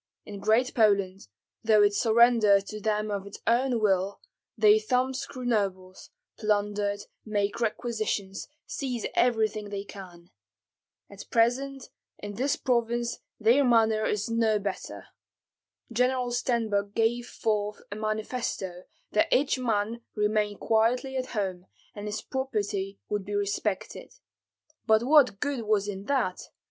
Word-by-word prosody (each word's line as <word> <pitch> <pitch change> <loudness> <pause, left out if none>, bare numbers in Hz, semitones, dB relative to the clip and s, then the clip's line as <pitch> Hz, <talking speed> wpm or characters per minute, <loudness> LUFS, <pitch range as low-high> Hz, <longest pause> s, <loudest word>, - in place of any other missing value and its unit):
In 205 -1 -8
Great 220 +5 +2
Poland, 200 - +2 0.4
though 215 -2 +5
it 205 0 +4
surrendered 220 -3 +4
to 215 +1 -7
them 210 0 0
of 200 -1 -3
its 200 - -10
own 245 +1 +2
will, 195 -2 +1 0.4
they 215 0 +6
thumbscrew 255 +3 -2
nobles, 190 -5 -2 0.3
plunder, 205 -1 0 0.3
make 205 -1 -1
requisitions, 215 -4 -2 0.2
seize 250 -5 -4
everything 220 -3 +1
they 200 -1 -4
can. 180 -4 -12 0.8
At 200 0 -11
present 260 +4 +1 0.3
in 205 0 -7
this 265 +7 0
province 240 -1 0 0.2
their 235 +6 +4
manner 225 -3 +3
is 210 0 -1
no 230 -2 +2
better. 200 -2 -5 0.9
General 250 +1 +1
Stenbok 220 -5 0
gave 235 +2 +1
forth 210 -1 -2
a - - -4
manifesto 215 -4 -3 0.3
that 210 - +2
each 275 0 +2
man 225 -1 -1
remain 210 -1 0
quietly 240 +4 +1
at 255 -1 -2
home, 185 -2 -2 0.3
and 205 0 -7
his 210 0 -4
property 205 -7 -3
would 205 -1 -2
be 205 +1 -5
respected. 205 - -3 0.7
But 220 0 +4
what 265 -6 +5
good 285 -4 -1
was 210 -1 +1
in 195 -1 -5
that! 250 -9 -1
215 Hz, 130 wpm, -27 LUFS, 205-240 Hz, 0.9 s, they